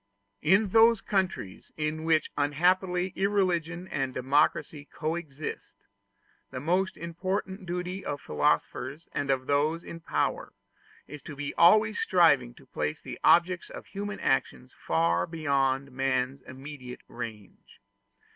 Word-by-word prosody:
In 190 Hz, +7 st, +4 dB
those 225 Hz, +2 st, +6 dB
countries 190 Hz, -, -2 dB
in 155 Hz, +1 st, -2 dB
which 160 Hz, -1 st, +2 dB
unhappily 180 Hz, +5 st, +1 dB
irreligion 180 Hz, -3 st, 0 dB
and 135 Hz, -2 st, -2 dB
democracy 145 Hz, +2 st, +1 dB
coexist, 155 Hz, -2 st, -5 dB, 0.7 s
the 130 Hz, -, -6 dB
most 180 Hz, +7 st, 0 dB
important 185 Hz, +3 st, -4 dB
duty 180 Hz, +2 st, -4 dB
of 145 Hz, -1 st, -3 dB
philosophers 135 Hz, -, -1 dB
and 140 Hz, -1 st, -3 dB
of 130 Hz, -1 st, +1 dB
those 150 Hz, +4 st, +1 dB
in 165 Hz, -, -8 dB
power 165 Hz, -, -2 dB, 0.5 s
is 150 Hz, -2 st, -10 dB
to 150 Hz, -, -9 dB
be 145 Hz, 0 st, -4 dB
always 215 Hz, +5 st, +5 dB
striving 145 Hz, -9 st, +3 dB
to 140 Hz, -, -17 dB
place 75 Hz, -10 st, -3 dB
the -, -, -8 dB
objects 180 Hz, +1 st, +4 dB
of -, -, -9 dB
human 205 Hz, +1 st, -5 dB
actions -, -, -1 dB
far 85 Hz, +2 st, +1 dB
beyond 140 Hz, -3 st, 0 dB
man's 130 Hz, 0 st, -1 dB
immediate 130 Hz, -1 st, -9 dB
range. 110 Hz, -4 st, -9 dB
155 Hz, 125 wpm, -28 LUFS, 135-180 Hz, 0.7 s, those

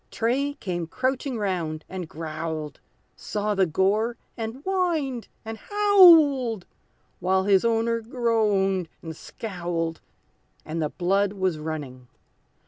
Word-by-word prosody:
Tray 275 Hz, +5 st, 0 dB
came 175 Hz, -, -4 dB
crouching 260 Hz, -, -1 dB
round, 175 Hz, -7 st, -2 dB
and 185 Hz, -3 st, -6 dB
growled, 155 Hz, -1 st, -5 dB, 0.4 s
Saw 210 Hz, 0 st, -2 dB
the 190 Hz, -2 st, +2 dB
gore, 210 Hz, +8 st, +1 dB, 0.2 s
and 230 Hz, +4 st, -5 dB
whined, 330 Hz, -, -1 dB, 0.2 s
and 225 Hz, 0 st, -6 dB
howled, 325 Hz, -, +5 dB, 0.5 s
While 190 Hz, +1 st, +2 dB
his 195 Hz, -1 st, +4 dB
owner 230 Hz, 0 st, +1 dB
groaned 215 Hz, -, +1 dB
and 160 Hz, -1 st, -6 dB
scowled, 170 Hz, -5 st, -4 dB, 0.6 s
And 160 Hz, +1 st, -3 dB
the 150 Hz, -, 0 dB
blood 195 Hz, +4 st, +1 dB
was 185 Hz, -5 st, -1 dB
running. 145 Hz, -5 st, -6 dB
200 Hz, 115 wpm, -25 LUFS, 170-240 Hz, 0.6 s, howled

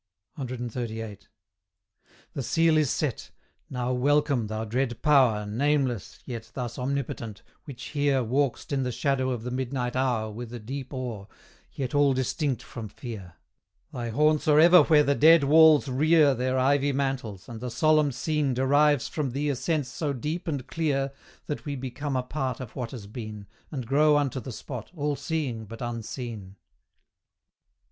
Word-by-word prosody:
CXXXVIII. 120 Hz, -4 st, -5 dB, 1.1 s
The 140 Hz, -, -3 dB
seal 165 Hz, +6 st, +3 dB
is 155 Hz, -4 st, +3 dB
set. 140 Hz, -3 st, -2 dB, 0.4 s
Now 125 Hz, -1 st, -2 dB
welcome, 140 Hz, -2 st, +2 dB
thou 110 Hz, +1 st, -3 dB
dread 120 Hz, +1 st, -1 dB
Power 130 Hz, -8 st, +4 dB
Nameless, 130 Hz, 0 st, 0 dB
yet 115 Hz, -3 st, -7 dB
thus 125 Hz, -2 st, -4 dB
omnipotent, 125 Hz, -5 st, -3 dB, 0.2 s
which 135 Hz, -5 st, -9 dB
here 145 Hz, -3 st, +1 dB
Walk'st 130 Hz, +5 st, -1 dB
in 135 Hz, -, +1 dB
the 125 Hz, -1 st, -1 dB
shadow 130 Hz, 0 st, 0 dB
of 120 Hz, -3 st, -3 dB
the 125 Hz, -, -4 dB
midnight 125 Hz, -1 st, -2 dB
hour 120 Hz, -4 st, 0 dB
With 115 Hz, +2 st, -7 dB
a -, -, -6 dB
deep 130 Hz, +4 st, -6 dB
awe, 120 Hz, -7 st, -5 dB, 0.4 s
yet 130 Hz, -3 st, -4 dB
all 145 Hz, -2 st, +4 dB
distinct 130 Hz, +1 st, -1 dB
from 115 Hz, -3 st, -7 dB
fear: 105 Hz, -4 st, -9 dB, 0.6 s
Thy 120 Hz, -2 st, -4 dB
haunts 150 Hz, +6 st, +2 dB
are 150 Hz, 0 st, +6 dB
ever 175 Hz, +3 st, +8 dB
where 150 Hz, -2 st, +5 dB
the 140 Hz, -, +2 dB
dead 160 Hz, +2 st, +6 dB
walls 155 Hz, +1 st, +6 dB
rear 150 Hz, +2 st, +4 dB
Their 130 Hz, +1 st, -1 dB
ivy 140 Hz, +2 st, +2 dB
mantles, 130 Hz, -8 st, -3 dB
and 115 Hz, -2 st, -7 dB
the 125 Hz, -, -3 dB
solemn 155 Hz, +2 st, +3 dB
scene 145 Hz, 0 st, -1 dB
Derives 145 Hz, +1 st, +3 dB
from 140 Hz, -6 st, -3 dB
thee 145 Hz, +2 st, -1 dB
a 140 Hz, -, 0 dB
sense 150 Hz, +1 st, -1 dB
so 145 Hz, +2 st, -2 dB
deep 155 Hz, +7 st, -4 dB
and 140 Hz, -6 st, -2 dB
clear 140 Hz, -4 st, -1 dB, 0.3 s
That 150 Hz, -, -4 dB
we 145 Hz, -1 st, -3 dB
become 135 Hz, +2 st, -4 dB
a 130 Hz, -, 0 dB
part 130 Hz, -2 st, -3 dB
of 125 Hz, -4 st, -8 dB
what 125 Hz, -3 st, -4 dB
has 115 Hz, -5 st, -8 dB
been, 105 Hz, -1 st, -7 dB, 0.2 s
And 135 Hz, -6 st, -5 dB
grow 150 Hz, +4 st, +4 dB
unto 140 Hz, -3 st, 0 dB
the 130 Hz, -, -7 dB
spot, 120 Hz, -1 st, -7 dB
all 145 Hz, -2 st, -1 dB
seeing 135 Hz, -9 st, -3 dB
but 115 Hz, +2 st, -10 dB
unseen. 115 Hz, -4 st, -6 dB
130 Hz, 165 wpm, -27 LUFS, 120-145 Hz, 1.1 s, ever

